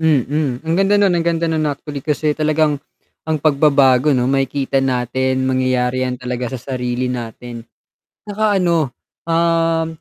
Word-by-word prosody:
Mm, 145 -3 0
ang 160 +1 0
ganda 195 +1 +3
nun, 200 -2 +3
ang 170 -1 0
ganda 170 0 +1
nun 160 -2 0
actually, 145 0 -5
kasi 150 +1 0
talagang 155 -1 +1 0.5
ang 160 - +1
pagbabago 140 -2 +3
'no 125 - +1
makikita 135 0 0
natin 130 0 0
mangyayari 130 -1 0
yan 125 - -3
talaga 125 -1 -4
sa 125 +3 -8
sarili 125 0 -2
natin. 120 0 -7 0.6
'Tsaka 210 0 0
ano, 170 -6 +1 0.4
um 165 -1 +1
140 Hz, 145 wpm, -18 LUFS, 130-160 Hz, 0.6 s, ganda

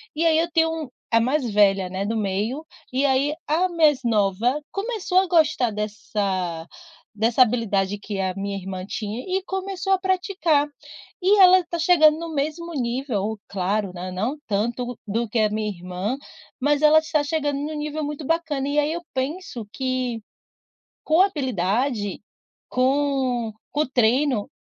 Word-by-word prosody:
E 330 +2 0
aí 320 -1 +4
eu 335 +1 0
tenho 325 -4 0 0.2
a 230 - +5
mais 260 +1 +1
velha 195 -3 +3
não 190 +1 -5
é 200 - -1
do 225 0 -1
meio, 215 +9 -2 0.3
e 265 +3 +1
aí 275 +2 +2
a 345 +5 +2
mais 310 -5 +3
nova 225 +4 +1
começou 400 -3 0
a 380 - +1
gostar 315 -8 +3
dessa 200 -5 -3 0.5
dessa 230 +4 +4
habilidade 205 -4 0
que 205 -1 -5
a 190 -1 0
minha 200 0 -3
irmã 185 -1 -6
tinha 215 +3 -4
e 380 +1 -1
começou 385 0 -2
a 380 - +2
praticar. 365 -5 +1 0.5
E 400 +3 +4
ela 370 -1 +8
está 345 -1 -4
chegando 315 -3 +5
no 335 -1 -6
mesmo 315 +4 -3
nível, 235 -5 -2
claro, 195 +1 -1
né, 180 +1 -6
não 220 +10 -2
tanto 235 +3 -2
do 225 +2 -1
que 230 - -2
a 215 -1 +3
minha 215 0 -1
irmã, 185 +5 -4 0.4
mas 290 +2 +2
ela 305 +1 +6
está 315 -2 0
chegando 290 -1 -1
em 300 +2 -3
um - - -4
nível 300 +1 -3
muito 295 0 -5
bacana 320 -4 -1
e 295 +1 +2
aí 295 +1 +1
eu 345 - -4
penso 265 -2 -3
que, 255 -3 -2 0.8
com 315 +3 +3
habilidade, 240 - -1 0.5
com 260 -3 +1 0.2
com 300 0 +1
treino 250 -1 +2
260 Hz, 160 wpm, -23 LUFS, 210-315 Hz, 0.8 s, ela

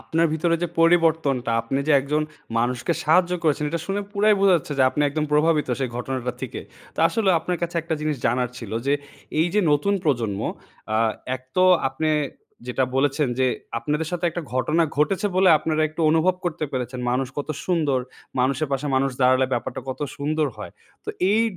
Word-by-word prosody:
আপনার 165 +1 +1
ভিতরে 165 +2 +1
যে 175 - 0
পরিবর্তনটা, 160 -7 +3
আপনি 115 +4 -2
যে - - +5
একজন 150 +3 0 0.4
মানুষকে 125 +7 0
সাহায্য 175 +3 +4
করেছেন 150 -1 +1
এটা 170 +1 -2
শুনে 195 +1 -1
পুরাই 210 +1 +4
বোঝা 195 -1 +5
যাচ্ছে 150 -2 -5
যে - - +5
আপনি 150 - 0
একদম 150 +2 -1
প্রভাবিত 150 0 +3
সেই 130 - -1
ঘটনাটা 125 0 -3
থেকে। 130 - -5 0.3
তো - - -24
আসলেও 200 -3 +2
আপনার 180 0 -2
কাছে 170 0 -2
একটা 165 0 -2
জিনিস 155 -1 -1
জানার 125 +1 0
ছিল। 115 -5 -8
যে 140 - +3 0.5
এইযে 175 +6 +2
নতুন 200 +8 +2
প্রজন্ম 115 -9 0 0.5
আ - - +3 0.4
১ 130 - -8
তো 185 - +4 0.3
আপনে 155 +4 -1 0.6
যেটা 125 +1 0
বলেছেন 140 +1 +2
যে 130 - +3 0.3
আপনাদের 150 +5 -2
সাথে 175 0 -2
একটা 170 +1 -5
ঘটনা 150 +6 +2
ঘটেছে 180 +8 +1
বলে 190 0 +5
আপনারা 155 0 0
একটু 155 +2 -8
অনুভব 165 +3 +3
করতে 165 -2 -2
পেরেছেন 125 -1 -3
মানুষ 130 +1 0
কত 145 - -4 0.2
সুন্দর। 155 -7 +1 0.4
মানুষের 135 +3 +1
পাশে 135 +2 -1
মানুষ 135 +1 +2
দাঁড়ালে 130 +1 +4
ব্যাপারটা 120 - -2
কত 130 - -5 0.2
সুন্দর 155 +2 0
হয়। - - -8 0.3
তো - - -11 0.2
এই 220 +2 +4
150 Hz, 180 wpm, -23 LUFS, 130-170 Hz, 0.6 s, যে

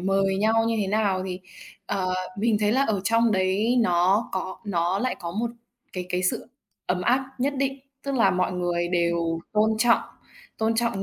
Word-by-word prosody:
mời 195 +1 +1
nhau 225 +3 +3
như 230 - +1
thế 200 - 0
nào 200 -2 +1
thì, 185 0 -5 0.5
ờ, 185 -2 -1 0.2
mình 220 0 +2
thấy 210 0 +2
là 265 +3 +3
ở 215 -7 0
trong 230 +1 +3
đấy 195 +6 +1
nó 185 +2 +3
có 190 0 -3
nó 180 0 0
lại 255 +3 -1
có 170 -1 -4
một 230 +5 -2 0.4
cái 180 -1 -4
cái 180 0 -1
sự 185 - -1 0.4
ấm 180 0 0
áp 260 +5 +2
nhất 280 +3 0
định. 270 0 -1 0.2
Tức 275 -1 -3
là 225 -7 +4
mọi 185 0 0
người 175 -1 -1
đều 170 -1 0
tôn 215 +1 +3
trọng, 235 +1 +4 0.6
tôn 225 +1 +1
trọng 230 -4 0
195 Hz, 190 wpm, -25 LUFS, 180-230 Hz, 0.6 s, là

